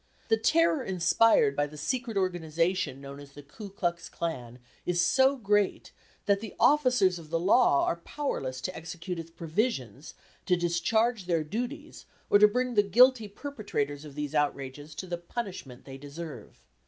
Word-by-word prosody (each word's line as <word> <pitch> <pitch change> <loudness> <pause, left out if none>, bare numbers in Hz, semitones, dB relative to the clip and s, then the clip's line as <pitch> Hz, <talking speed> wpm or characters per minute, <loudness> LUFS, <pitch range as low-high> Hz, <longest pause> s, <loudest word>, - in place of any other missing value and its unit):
The 225 - +4
terror 320 +4 +2
inspired 185 - +3
by 145 +1 +1
the 150 +1 -12
secret 235 - -2
organization 175 -4 -1
known 140 0 -9
as 140 -1 -13
the 145 - -11
Ku 200 +9 -10
Klux 175 -3 -3
Klan 125 -8 -5 0.3
is 175 -1 -1
so 265 +10 +4
great, 205 -4 0 0.3
that 200 -1 +3
the 215 -2 -8
officers 250 -11 +3
of 155 -2 -13
the 165 +1 0
law 190 - +4
are 170 - -1
powerless 135 - -4
to 185 - -4
execute 175 +1 -6
its 165 0 -8
provisions, 160 - -3 0.3
to 180 - +4
discharge 195 +6 0
their 165 -3 +1
duties, 240 - -6 0.3
or 205 - +7
to 210 - +8
bring 250 +3 -1
the 210 - +5
guilty 230 +3 +4
perpetrators 200 - -4
of 145 -2 -11
these 150 0 -4
outrages 145 0 -2
to 185 - -5
the 175 -1 -4
punishment 175 - -7
they 135 -1 -9
deserve. 145 - -9
175 Hz, 165 wpm, -28 LUFS, 150-220 Hz, 0.3 s, to